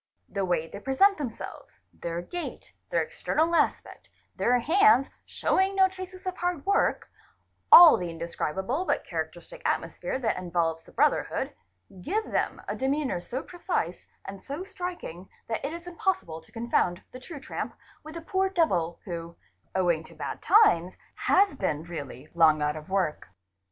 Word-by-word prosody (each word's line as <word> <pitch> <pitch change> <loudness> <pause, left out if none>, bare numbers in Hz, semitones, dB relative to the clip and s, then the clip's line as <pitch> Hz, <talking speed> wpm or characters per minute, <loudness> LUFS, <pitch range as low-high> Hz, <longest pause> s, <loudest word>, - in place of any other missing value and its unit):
'The 200 -2 -2
way 170 -3 0
they 200 - -9
pre 265 +5 -3
sent 395 +5 +5
themselves, 250 -6 -7
their 170 0 -4
gait, 350 - -7 0.2
their - - +2
external 325 +2 0
aspect, - - 0 0.3
their 245 +1 +3
hands 325 - +4 0.2
showing 385 +1 +1
'no 380 -1 +6
traces 370 0 -9
of 370 -1 -3
hard 355 -4 -2
work, 400 +1 +1 0.6
all 345 -2 +11
the 175 -1 -4
indescribable 170 - -3
but - - 0
characteristic - - -6
atmosphere - - -1
that 235 -5 0
envelopes 170 -2 -1
the - - -16
brotherhood, - - +1 0.5
give 425 - -2
them - - 0
a - - -2
demeanour 270 -7 -1
so 255 +9 -5
precise 345 - -3 0.2
and 195 0 -8
so 290 +6 -5
striking 355 - -7 0.2
that 225 - -3
it 280 - -2
is 340 +1 -7
impossible 350 - -2
to - - -22
confound 225 -6 0
the 255 - -9
true 285 +3 -9
tramp - - -5 0.3
with 310 +1 -10
the 335 - -5
poor 380 +3 0
devil 180 - +1
who, 170 -2 -6 0.4
owing 175 -4 +2
to - - -15
bad - - -5
times, 185 - +4 0.2
has 390 -3 +3
been 160 - -1
really 145 -5 -7
long 160 -2 +5
out 150 0 0
of 155 +2 -9
work. 190 -6 -1
245 Hz, 160 wpm, -27 LUFS, -, 0.6 s, all